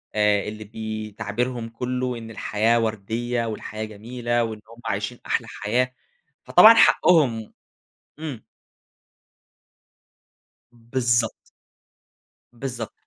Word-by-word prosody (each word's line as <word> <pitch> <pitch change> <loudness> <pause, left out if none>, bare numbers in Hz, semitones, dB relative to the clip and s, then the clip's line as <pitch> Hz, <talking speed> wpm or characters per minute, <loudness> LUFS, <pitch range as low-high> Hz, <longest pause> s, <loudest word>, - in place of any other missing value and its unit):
آآ، 105 -1 +3
اللي 110 0 -6
بي 110 0 -6
تعبيرهم 115 +3 -3
كلّه 125 +1 -3
إن 115 -1 -8
الحياة 110 +2 +1
ورديّة 115 +2 -2
والحياة 110 0 -5
جميلة 120 +3 -2
وإن 110 -2 -5
هُم 115 +1 -14
عايشين 100 +4 -3
أحلى - - -1
حياة 125 +5 -1 0.5
فطبعًا 225 +1 +9
حقهم 135 - +4 0.7
إمم. 145 -8 -6 2.3
بالضبط. 120 -1 0 1.2
بالضبط. 120 -2 -5
115 Hz, 90 wpm, -24 LUFS, 110-120 Hz, 2.3 s, فطبعًا